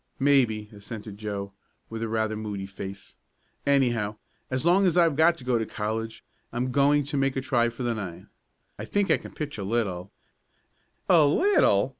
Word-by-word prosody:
"Maybe," 125 -7 +3
assented 105 0 -8
Joe 100 -2 -4 0.3
with 115 0 -6
rather 110 -1 -1
a - - -4
moody 105 -2 -4
face. 100 0 -8 0.5
"Anyhow, 120 -7 +2 0.3
as 130 +3 -2
long 185 +3 +5
as 180 - +1
I've 165 -4 +4
got 165 +3 +4
to - - -11
go 125 -2 +1
to 110 - -1
college 110 +1 -4 0.3
I'm 125 +2 -2
going 145 +2 +4
to 145 +1 -3
make 135 -1 +1
a - - 0
try 120 -3 +2
for 120 +2 -7
the 120 -1 0
nine. 95 -6 -6 0.5
I - - -4
think 205 -1 +1
I - - +5
can - - -11
pitch 145 -6 -5
a - - -3
little 100 -4 -2 0.5
" - - -43 0.2
"A 170 -4 +6
little!" 390 - +4
120 Hz, 185 wpm, -26 LUFS, 105-140 Hz, 0.5 s, A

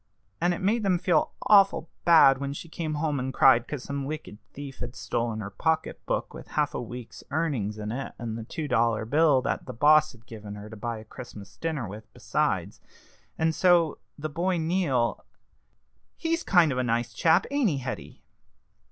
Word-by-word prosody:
And 175 +1 +3
it - - -8
made 220 +4 +2
them 190 -3 +2
feel 175 -3 +1
awful 195 -5 +5 0.2
bad 160 -6 +7
when 140 0 -3
she 155 - -8
came 160 -1 -4
home 150 -2 -1
and 130 +1 -2
cried 130 -3 +5
'cause 150 -4 -5
some 140 0 -4
wicked 150 -7 -6
thief 140 -2 -9
had 120 0 -6
stolen 110 +2 -2
her 100 -1 -6
pocket 160 +10 -1
book - - -2
with - - -10
half - - +2
a - - -3
week's 120 0 -9
earnings 135 -9 -1
in 105 0 -4
it, 135 +4 -5
and 115 -2 -5
the 115 - -5
two 150 +6 -5
dollar 115 -4 +1
bill 145 +1 +3
that 140 - -2
the - - -5
boss 155 +4 +5
had 115 -1 -19
given 105 -3 -9
her 105 +1 -10
to - - -8
buy 115 +2 -4
a 110 - -9
Christmas 105 -6 -11
dinner 155 -8 -3
with 105 +3 -10
besides. - - -1 0.6
And 160 0 +1
so 170 -3 +3 0.2
the 155 +1 -3
boy 175 +4 -1
Neal 160 -8 0 0.9
he's 330 0 -1
kind 175 - +4
of 130 - -1
a - - +1
nice 120 0 -1
chap, 165 +1 +3
ain't 280 -6 +2
he, 145 - -1
Hetty?" 130 -1 -6
140 Hz, 195 wpm, -27 LUFS, 115-165 Hz, 0.9 s, bad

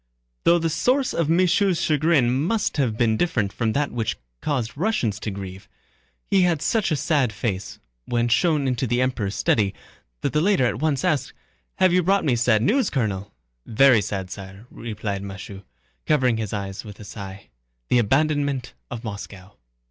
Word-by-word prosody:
Though 170 - +6
the 165 -1 0
source 255 - +1
of 165 -2 0
M. 165 - +4
Michaud's 185 0 +3
chagrin 150 -4 +3
must 175 - 0
have 120 -6 0
been 110 -2 +2
different 110 - 0
from 110 -2 -1
that 145 0 0
which 115 -3 -2 0.2
caused 130 -7 -2
Russians 140 - 0
to 110 - -4
grieve, 95 -1 -8 0.6
he 195 -1 +3
had 175 -4 +2
such 220 -5 +1
a 155 - +1
sad 140 -3 +1
face 100 -3 -4 0.3
when 120 0 +1
shown 145 +3 +2
into 125 0 0
the 120 +2 +1
Emperor's 120 -6 -1
study 100 -3 +1 0.5
that - - -1
the 150 - +2
latter 190 -7 +3
at 120 -1 -1
once 150 -1 0
asked: 145 -7 0 0.4
"Have 185 -2 +3
you 180 - +4
brought 195 +2 +2
me 130 -5 +3
sad 115 -2 +3
news, 245 - +2
Colonel?" 100 -6 -2 0.4
"Very 120 0 +5
sad, 95 -2 -4
sire," 95 +2 -9
replied 105 -3 -4
Michaud, 100 0 -8 0.5
lowering 130 -6 +3
his 110 -3 -3
eyes 100 -2 -4
with 105 -2 -11
a - - -9
sigh. 100 - -9 0.4
"The 125 - +4
abandonment 140 +2 +1 0.2
of 120 -1 -6
Moscow." 100 -3 -8
125 Hz, 175 wpm, -23 LUFS, 105-155 Hz, 0.6 s, Though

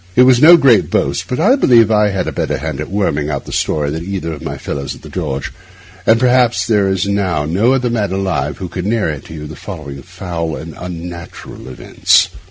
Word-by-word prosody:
It 125 - +6
is 125 -1 +5
no 170 +3 +9
great 130 - +4
boast, - - -1
but 125 - -3
I 215 +11 +4
believe 115 - +4
I 105 -1 +3
was 95 -1 -2
a - - -3
better - - -2
hand 75 0 -4
at 75 - -6
worming 75 -7 -1
out 70 -2 -4
a - - -7
story 75 -2 -1
than 80 +2 -4
either 90 -3 -4
of 75 - -9
my - - -5
fellows 70 0 -5
at - - -17
the - - -10
George; 70 -7 -4 0.5
and 115 +1 +5
perhaps 125 -1 +3
there 105 -4 +2
is 95 0 0
now 95 -7 0
no 100 - +2
other 125 -2 0
man 105 -5 -1
alive 90 -8 -2
who 90 - -5
could 90 +2 -5
narrate 100 - -1
to 80 - -10
you 75 -1 -7
the 75 +1 -9
following 75 -8 -8
foul 85 +1 -5
and 80 +2 -8
unnatural 85 -2 -8
events. 65 - +2
90 Hz, 220 wpm, -16 LUFS, 75-110 Hz, 0.5 s, no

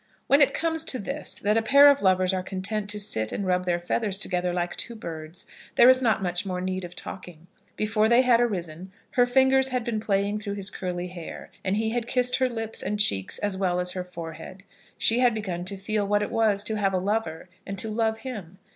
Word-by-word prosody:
When 280 +2 +4
it 275 -1 +4
comes 325 -1 0
to 270 - -1
this, 275 +7 -4
that 210 +2 +2
a - - +3
pair 280 +6 +7
of 285 -1 +5
lovers 185 -1 +3
are 185 - -1
content 200 +3 -3
to 210 0 -3
sit 110 - -1
and 200 - -3
rub 180 0 0
their 175 -1 0
feathers 195 +3 -1
together 180 -3 -1
like 175 0 -2
two 235 - -4
birds, 165 -3 -8 0.3
there 240 - +7
is 260 0 +6
not 225 -5 +1
much 175 -1 -1
more 185 -2 -3
need 185 0 -3
of 175 0 -8
talking. 175 -3 -9 0.3
Before 215 0 +1
they 240 +2 +5
had 240 -2 +4
arisen, 185 -5 -3 0.2
her 245 -1 +3
fingers 265 +1 +4
had 250 -2 -2
been 230 -2 -2
playing 205 0 0
through 205 -1 -5
his 200 0 -1
curly 180 -1 -4
hair, 175 -2 -9
and 195 +2 0
he 220 0 0
had 240 0 -2
kissed 250 0 +2
her 260 -1 +1
lips 225 -2 -3
and 210 - -3
cheeks 95 - +2
as 205 -2 -1
well 180 -2 0
as 180 0 +1
her 180 0 -4
forehead. 180 +2 -9 0.3
She 230 +2 +3
had 245 -3 +3
begun 180 -5 -4
to 195 +1 -4
feel 205 +1 -1
what 205 0 +2
it - - -4
was 210 -3 +2
to 215 +1 -2
have 195 -2 +1
a - - +2
lover 190 -4 -2 0.2
and 195 0 -6
to 205 - 0
love 220 0 -1
him. 200 -9 -7
205 Hz, 230 wpm, -26 LUFS, 180-225 Hz, 0.3 s, pair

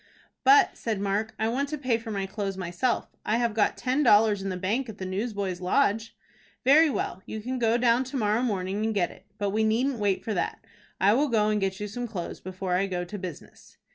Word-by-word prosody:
"But," 415 0 +6
said 220 -4 -2
Mark, 205 +3 -1
"I 220 - 0
want 275 +5 -1
to 305 - -3
pay 255 -5 0
for 230 0 -9
my 200 -2 -2
clothes 195 -1 -4
myself. 180 +7 -1 0.2
I 220 - +1
have 235 -2 0
got 215 -1 +1
ten 255 +3 0
dollars 210 -5 +5
in 195 - -3
the 185 - -3
bank 225 +8 -1
at 210 - -8
the 190 - -5
Newsboys' 195 -2 -3
Lodge." 220 +3 +1 0.5
"Very 305 +4 +7
well. 190 -8 -3
You 220 - -5
can 255 +4 -4
go 230 0 +3
down 240 +1 +3
to 260 +2 -4
morrow 215 0 +1
morning 200 -3 -1
and 220 -1 -1
get 180 -3 +1
it. 195 - -17
But 205 -2 -1
we 220 +2 +1
needn't 235 +4 +1
wait 200 -2 0
for 220 - -2
that. 180 - -3 0.3
I 200 +2 +5
will 285 +6 +2
go 215 -4 +2
and 210 -1 +1
get 190 0 -1
you 210 - -3
some 240 +4 -5
clothes 190 -6 -6
before 185 0 -4
I 190 +2 +2
go 180 -2 -3
to 205 +3 -7
business." 180 -5 -10
215 Hz, 230 wpm, -27 LUFS, 195-240 Hz, 0.5 s, Very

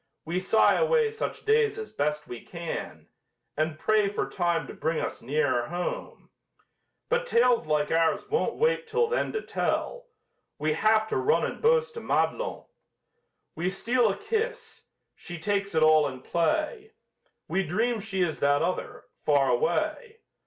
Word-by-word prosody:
We 170 +3 -1
sigh 190 +4 +4
away 480 -2 +3
such 445 - -5
days 435 -1 +3
as 440 -1 -6
best 150 +1 -2
we 120 - -7
can, 170 -2 -6 0.5
And 155 +1 -1
pray 210 +3 +2
for 205 - -2
time 175 -3 0
to - - -9
bring 160 0 -1
us - - -4
nearer 130 -2 0
home, 175 +1 -5 0.8
But 485 +1 0
tales 240 - +3
like 150 -1 +1
ours 165 0 +1
won't 455 +3 0
wait 475 0 +1
till 470 +1 +1
then 480 +2 -1
to 435 - -3
tell - - -2 0.5
We 155 +1 0
have 215 +6 +3
to - - 0
run 400 +4 +2
and - - -5
boast 470 +1 +3
to 460 - -7
Madelon. - - -1 0.9
We 175 +3 -1
steal 230 +4 +1
a 195 - -2
kiss 455 0 -3 0.3
she 175 -1 -9
takes 200 +2 -1
it 160 - +4
all 155 -1 +5
in 130 -2 -7
play; 315 - -1 0.5
We 195 - 0
dream 220 +7 0
she 195 -3 -1
is 165 -3 -2
that 145 +1 +3
other 180 +2 -3 0.2
far 140 -2 +3
away. 470 -1 -1
205 Hz, 160 wpm, -27 LUFS, -, 0.9 s, all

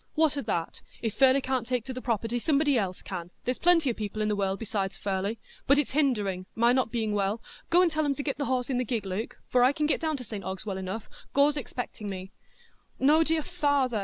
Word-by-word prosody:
"What 310 -2 +3
o' 280 - -1
that? 170 -8 -3 0.2
If 225 -3 -1
Furley 270 0 +5
can't 255 -3 -1
take 250 -3 -1
to 260 - -5
the 255 - -6
property, 230 0 -1
somebody 290 +1 +2
else 190 -6 -1
can; 175 -3 -5 0.2
there's 250 +1 -1
plenty 335 -6 +4
o' - - -3
people 215 -1 -5
in 210 - +1
the 210 - +1
world 195 -1 0
besides 195 -3 -3
Furley. 200 +2 -2 0.3
But 280 - +6
it's 295 - +1
hindering—my 230 -5 +1
not 255 -2 +2
being 225 -3 -1
well—go 215 - +1
and 345 - +3
tell 310 0 0
'em 285 -2 +1
to 285 - -4
get 275 0 -2
the 285 - 0
horse 255 0 0
in 250 - +1
the - - +2
gig, 225 -4 -2
Luke; 195 +5 -4 0.2
I 250 +1 +6
can 300 +1 -1
get 300 - +1
down 315 -2 0
to 255 - -6
St 210 -4 -6
Ogg's 190 +2 -4
well 195 -3 -3
enough—Gore's 225 +9 -1
expecting 245 -6 -5
me." 190 0 -6 0.7
"No, 300 +4 +5
dear 320 -1 +1
father!" 275 -7 +1
245 Hz, 225 wpm, -28 LUFS, 205-280 Hz, 0.7 s, But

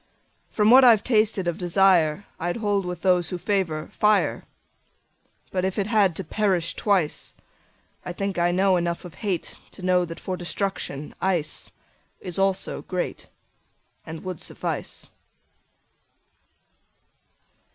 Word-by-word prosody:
From 210 +1 +3
what 260 +2 +9
I've 225 -4 +6
tasted 215 -5 +1
of 175 - -2
desireI 175 -1 +2
hold 205 -4 0
with 180 -1 -6
those 180 -3 +3
who 180 - -3
favor 175 -5 -1
fire. 210 -1 +2 1.1
But 185 -1 -1
if 190 0 -1
it 200 - +1
had 205 -5 +3
to 190 - -4
perish 185 -2 0
twice,I 180 -1 -4
think 195 0 -3
I 175 0 +3
know 190 +1 +3
enough 170 0 -2
of 175 - -11
hateTo 190 -1 -5
know 180 -1 +3
that 165 -1 -8
for 185 - -4
destruction 175 -5 -3
iceIs 180 +1 -4
also 195 0 0
greatAnd 165 -2 -8
would 185 -3 -5
suffice. - - -5
185 Hz, 115 wpm, -24 LUFS, 175-200 Hz, 1.1 s, what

